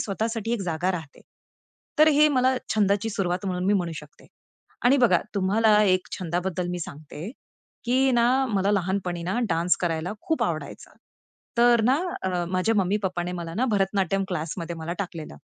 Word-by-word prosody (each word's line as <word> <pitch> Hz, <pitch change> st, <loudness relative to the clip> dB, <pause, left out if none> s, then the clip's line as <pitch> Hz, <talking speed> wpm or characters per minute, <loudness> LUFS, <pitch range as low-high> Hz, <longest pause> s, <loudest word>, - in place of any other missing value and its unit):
स्वतःसाठी 225 Hz, +2 st, -2 dB
एक 235 Hz, -, -1 dB
जागा 175 Hz, 0 st, -1 dB
राहते. 160 Hz, -5 st, -7 dB, 0.8 s
तर 310 Hz, +1 st, +7 dB
हे 300 Hz, +1 st, +6 dB
मला 260 Hz, -2 st, +2 dB, 0.2 s
छंदाची 205 Hz, +1 st, +1 dB
सुरुवात 185 Hz, -1 st, -2 dB
म्हणून 180 Hz, -1 st, -2 dB
मी 200 Hz, -, +3 dB
म्हणू 175 Hz, -4 st, -1 dB
शकते. 150 Hz, -1 st, -12 dB, 0.6 s
आणि 255 Hz, +3 st, +6 dB
बघा 225 Hz, -9 st, +4 dB
तुम्हाला 210 Hz, +2 st, +3 dB
एक 185 Hz, -2 st, +2 dB
छंदाबद्दल 180 Hz, 0 st, -2 dB
मी 180 Hz, -, -3 dB
सांगते, 155 Hz, +4 st, -8 dB, 0.5 s
की 260 Hz, +2 st, +3 dB
ना 235 Hz, 0 st, +4 dB, 0.2 s
मला 200 Hz, -4 st, +1 dB
लहानपणीना 185 Hz, 0 st, -1 dB
डान्स 170 Hz, +1 st, +2 dB
करायला 170 Hz, 0 st, -1 dB
खूप 320 Hz, -, -1 dB
आवडायचा. -, -, -5 dB, 0.7 s
तर 240 Hz, 0 st, +5 dB
ना 260 Hz, +3 st, +4 dB, 0.3 s
अ, 180 Hz, -2 st, -1 dB
माझ्या 185 Hz, +5 st, +1 dB
मम्मी-पप्पाने 185 Hz, -2 st, 0 dB
मला 170 Hz, -2 st, -5 dB
ना 235 Hz, +7 st, +1 dB
भरतनाट्यम 195 Hz, -1 st, +1 dB
क्लासमध्ये 170 Hz, 0 st, -4 dB
मला 165 Hz, +1 st, -4 dB
टाकलेलं. 165 Hz, -, -6 dB
190 Hz, 150 wpm, -25 LUFS, 175-220 Hz, 0.8 s, तर